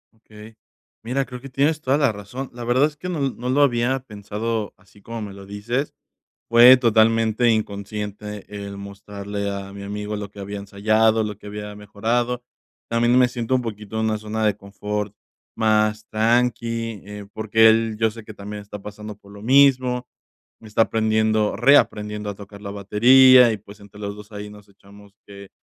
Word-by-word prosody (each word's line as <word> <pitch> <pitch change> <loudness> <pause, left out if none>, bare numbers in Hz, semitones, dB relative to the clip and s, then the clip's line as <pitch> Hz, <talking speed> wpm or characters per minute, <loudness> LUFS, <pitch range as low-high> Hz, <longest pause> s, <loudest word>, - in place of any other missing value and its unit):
Okey. 110 0 -15 0.5
Mira, 130 +4 -1
creo 125 -1 -9
que 135 - -9
tienes 150 +4 +1
toda 135 0 +2
la 140 -6 +3
razón, 105 +6 -7
la 120 0 -8
verdad 125 +4 +3
es 150 -1 -3
que 180 +4 -7
no 175 - -3
l 135 -2 -1
no 125 +1 -5
lo 145 +3 +3
había 125 0 +1
pensado 105 -1 -4
así 100 +2 -22
como 115 +1 -7
me 100 -2 -6
lo 100 0 -11
dices. 115 +8 -3 0.6
Fue 120 +2 +9
totalmente 115 0 +3
inconsciente 105 -1 -4
el 100 -1 -6
mostrarle 100 0 -6
a 100 0 -6
mi 100 0 -9
amigo 105 +1 -4
lo 105 -1 -6
que 105 - -16
había 100 +1 -6
ensayado, 110 +3 +2
lo 105 -2 -5
que 105 - -15
había 105 0 -7
mejorado. 115 +4 -2 0.5
También 120 +2 +3
me 125 -1 +5
siento 120 0 -2
un 125 - +1
poquito 110 -1 -6
en 110 - 0
una 110 -1 0
zona 110 +1 -3
de 105 -1 +1
confort 105 +1 -5 0.4
más 110 -1 +1
tranqui, 115 -1 0
eh, 105 0 -9
porque 110 +1 +4
él, 110 0 +2
yo 110 -1 +2
sé 115 0 -11
que 110 - -10
también 105 0 -8
está 105 0 -9
pasando 105 +1 -9
por 100 -1 -18
lo 100 - -12
mismo. 130 -1 +4 0.5
Está 110 0 +1
aprendiendo 110 -1 +1
reaprendiendo 105 -5 +2
a 100 - -6
tocar 100 0 -12
la 100 - -6
batería 125 +5 +6
y, 105 - -4
pues, 100 +1 -15
entre 100 0 -14
los 100 0 -5
dos 105 +1 -13
ahí 105 0 -7
nos 105 -1 -15
echamos 100 0 -18
que 100 -1 -12
110 Hz, 185 wpm, -22 LUFS, 105-120 Hz, 0.6 s, Fue